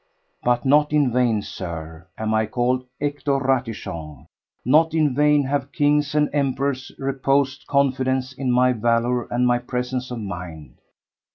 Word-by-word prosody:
But 120 +1 +1
not 150 +2 +4
in 145 -4 +3
vain, 115 -4 +1
Sir, 80 0 -7
am 110 0 -1
I 110 0 +1
called 125 +3 0
Hector 145 -1 -1
Ratichon; 115 - -3 0.4
not 160 +5 +4
in 150 -4 +2
vain 150 +1 +3
have 140 0 -2
kings 145 0 +1
and 150 -1 +3
emperors 140 -2 -1
reposed 135 0 0
confidence 130 -2 +1
in 130 -1 -2
my 125 +1 +4
valour 120 +1 0
and 125 +1 +1
my 120 0 +3
presence 125 +1 -3
of 125 -2 -5
mind. 90 - -7
130 Hz, 145 wpm, -22 LUFS, 115-140 Hz, 0.4 s, not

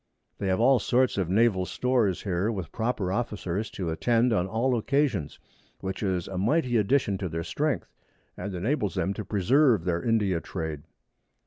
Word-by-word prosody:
They 100 - -2
have 95 +1 +1
all 130 +2 +5
sorts 125 +4 +2
of 90 -3 -1
Naval 100 -1 +3
Stores 115 -2 0
here, 95 +2 0
with 95 -6 -5
proper 110 -5 -1
Officers 105 -2 -2
to 90 -4 -4
attend 115 +7 +2
on 90 -3 +1
all 120 +5 +1
Occasions, 120 - 0 0.4
which 95 0 -5
is 95 -4 -1
a 95 -1 -4
mighty 125 - +1
Addition 105 -2 +1
to 90 - -3
their 80 +1 -3
Strength, 145 - -2 0.4
and 100 -2 -5
enables 105 - -1
them 95 +1 0
to 105 - -5
preserve 110 - +3
their 85 -1 0
India 100 -5 +1
Trade. 80 -5 -5
100 Hz, 170 wpm, -27 LUFS, 90-120 Hz, 0.4 s, all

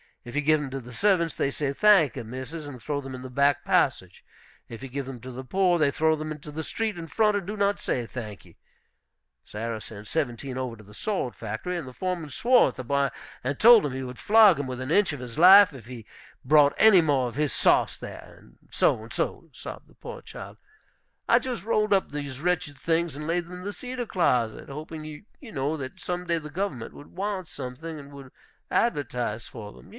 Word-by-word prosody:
If 120 - -9
you 150 - +2
give 155 +1 +3
them 140 - -4
to 135 - -3
the 125 -1 -11
servants, 175 - +2
they - - 0
say, 140 0 -2
'Thank 195 - +5
e, 130 - -4
missus,' 130 +7 -7
and 130 -4 -9
throw 145 +5 -2
them 135 -1 -7
in 125 - -9
the 130 - -7
back 140 +1 +2
passage. - - +1 0.5
If 115 +2 -9
you 135 - -6
give 135 +1 -4
them 130 -2 -7
to 130 +1 -8
the 130 +2 -7
poor, 180 +5 +2
they 150 -2 +4
throw 160 +2 +2
them 155 0 -5
into 150 0 -8
the 160 +2 -4
street 220 +3 -3
in 165 -1 -6
front, 210 +5 +2
and 195 - -4
do 210 +3 -5
not 200 0 +1
say, 120 - -2
'Thank 110 -4 -8
e.' - - -19 0.9
Sarah 110 +1 -5
sent 105 -1 -10
seventeen 130 -4 -3
over 125 -3 -3
to 110 - -15
the 105 +1 -16
sword 190 - -2
factory, 110 +12 -4
and 165 -6 -4
the 130 - -9
foreman 180 -1 -3
swore 245 - +4
at - - -10
the 130 - -6
boy, 140 +2 +1 0.3
and 135 +2 -2
told 235 -1 +8
him 145 -3 -2
he 130 0 -4
would 125 -1 -8
flog 210 -6 +6
him 145 - -3
within 130 +2 -5
an - - +5
inch 205 -4 +3
of 145 - -6
his 125 +2 -7
life 190 +3 +9
if 125 -5 -11
he 120 -4 -9 0.4
brought 145 +1 +5
any 215 -5 +7
more 140 -5 +1
of 120 - -7
his 150 0 0
sauce - - +3
there; - - -10
and - - -21
so - - +2
and - - -10
so," - - -3
sobbed - - -9
the - - -23
poor - - -9
child, - - -10 0.7
"I - - +5
just 250 -5 -5
rolled 215 -1 +2
up 195 - +1
these 140 -3 -5
wretched 170 -5 -1
things, 165 +1 0
and 150 +1 -6
laid 175 +1 0
them 175 - -12
in 180 0 -8
the 205 +1 -4
cedar 250 +1 -5
closet, 125 - 0
hoping, 155 +2 -7
you 155 - -11
know, 145 +1 -1
that 135 +6 -7
some 180 -2 -4
day 170 -1 +1
the 150 -1 -7
government 160 - -3
would 145 - -12
want 195 -2 -3
something, 145 +5 -7
and 140 0 -12
would 135 -2 -12 0.4
advertise 125 - -1
for 105 -4 -9
them. - - -16
145 Hz, 230 wpm, -26 LUFS, 130-180 Hz, 0.9 s, life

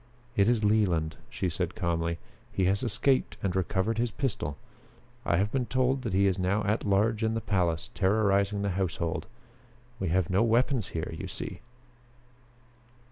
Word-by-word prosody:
"It 100 +1 +4
is 115 -3 +2
Leland," 95 -7 +2
she 95 - -2
said 90 +1 -2
calmly. 85 -4 -1 0.3
"He 95 - +1
has 100 +2 +2
escaped 125 +3 +1
and 95 -2 0
recovered 95 +4 0
his 120 0 +1
pistol. 100 - -3 0.7
I 85 - +3
have 100 +3 +1
been 130 -3 0
told 130 +1 +1
that 115 -6 -3
he 100 +1 +4
is 95 -1 +2
now 95 +3 +1
at 105 +2 0
large 105 +3 +2
in 110 0 +1
the - - 0
palace, 90 -7 0
terrorizing 100 0 +2
the 100 - 0
household. 85 -3 -2 0.7
We 95 - -1
have 90 0 +2
no 95 +4 +3
weapons 120 0 +2
here, 80 - -4
you - - -5
see." - - -5
100 Hz, 165 wpm, -29 LUFS, 90-110 Hz, 0.7 s, It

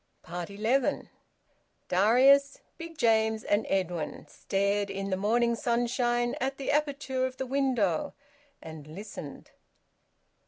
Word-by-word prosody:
ELEVEN. 205 +9 -1 0.8
Darius, 265 +9 +4 0.2
Big 330 -1 -8
James, 220 -3 +2
and 205 +1 0
Edwin 180 -4 -2
stared 200 +1 -1
in 195 0 -4
the - - +2
morning 235 +5 +2
sunshine 240 0 0
at 270 +1 -1
the 275 - -2
aperture 280 -3 0
of 260 0 -10
the 265 - -3
window 250 - 0 0.5
and 155 -2 -10
listened. 160 -3 -9
230 Hz, 110 wpm, -28 LUFS, 195-260 Hz, 0.8 s, Darius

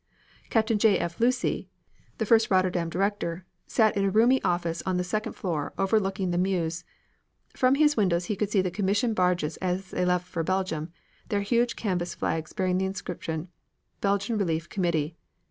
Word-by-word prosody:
Captain 220 -1 +2
J. 205 -3 +5
F. 170 0 -4
Lucey, 250 +2 +1 0.5
the 220 - -1
first 225 +1 +4
Rotterdam 185 -3 +2
director, 185 -1 -2 0.2
sat 220 -3 +3
in 200 - +1
a - - +3
roomy 235 +6 +4
office 170 -1 0
on 185 -1 0
the 180 - 0
second 215 +4 -2
floor 160 -6 -3
overlooking 195 -2 +1
the 175 - 0
Meuse. 175 -2 -1 0.7
From 255 +1 +3
his 300 0 +4
windows 180 -5 +2
he 210 - -2
could 205 +1 -1
see 205 -2 +3
the 185 - -1
commission 205 +4 +1
barges 180 -5 +1
as 185 0 -2
they - - -1
left 180 0 +1
for 175 -2 -3
Belgium, 175 -3 -1 0.4
their 205 -1 +1
huge 235 +3 +1
canvas 180 -5 -2
flags 160 -1 -2
bearing 185 -1 0
the 190 - +1
inscription 175 -3 -4 0.5
"Belgian 200 +2 0
Relief 165 -4 -1
Committee." 170 -4 -1
185 Hz, 170 wpm, -27 LUFS, 175-210 Hz, 0.7 s, J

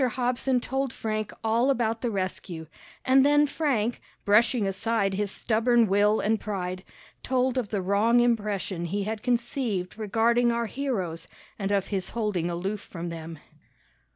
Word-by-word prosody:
Hobson 250 +1 +1
told 265 +1 -2
Frank 215 -2 -3
all 230 +4 +2
about 230 -4 0
the 245 - 0
rescue, 185 -4 -4 0.4
and 265 +1 +5
then 290 +1 +5
Frank, 255 -7 -1 0.2
brushing 220 +2 +4
aside 195 +1 0
his 205 +1 -1
stubborn 230 +3 +2
will 205 +2 +3
and 220 +1 +1
pride, 185 -3 -4 0.4
told 255 0 +1
of 245 -6 -1
the 200 -3 -2
wrong 210 +5 +3
impression 210 -6 0
he 200 +4 -2
had 215 +1 -4
conceived 235 -6 -1
regarding 230 +3 +2
our 235 0 0
heroes 205 -10 -3 0.3
and 195 0 -2
of 200 -2 0
his 190 -3 -2
holding 200 -7 0
aloof 190 +4 -3
from 175 -3 -7
them. 165 -1 -7
215 Hz, 150 wpm, -27 LUFS, 195-240 Hz, 0.4 s, and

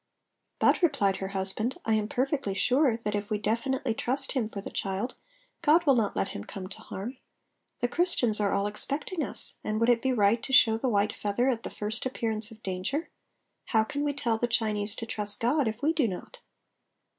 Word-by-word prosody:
"But," - - +3
replied 265 - +2
her 190 - -4
husband, 195 +5 -2
"I 225 - +2
am 215 -1 +1
perfectly 265 -5 -1
sure 255 +1 +3
that 210 -3 -3
if 205 0 -3
we 215 - 0
definitely 235 +4 -1
trust 265 +4 -1
Him 250 -6 0
for 215 - -6
the 195 - -7
child 195 +6 -2 0.5
God 335 +1 +4
will 280 - +6
not 225 -5 +1
let 95 - 0
him 100 - -6
come 185 - -7
to 195 - -10
harm. 235 +7 -7 0.6
The 245 - +2
Christians 245 -8 +2
are 205 -1 +1
all 200 - +1
expecting 285 - -2
us, - - -2
and 215 0 -1
would 230 +1 +3
it 235 -1 +4
be 265 - +1
right 225 -1 +3
to - - -5
show 225 -4 +7
the 250 +3 -1
white 205 -1 +2
feather 210 +5 0
at 235 -3 0
the - - -6
first 215 +3 -3
appearance 225 -3 -1
of 225 -1 -14
danger? 190 - -2 0.5
How 220 -2 +3
can 285 +6 -3
we 290 - +1
tell 235 -5 0
the 240 - +1
Chinese 215 -3 +1
to 230 - -5
trust 210 -2 0
God 260 +3 +2
if 220 +4 -4
we 315 +2 +3
do 300 -7 +2
not?" 210 - -7
225 Hz, 210 wpm, -28 LUFS, 210-265 Hz, 0.6 s, show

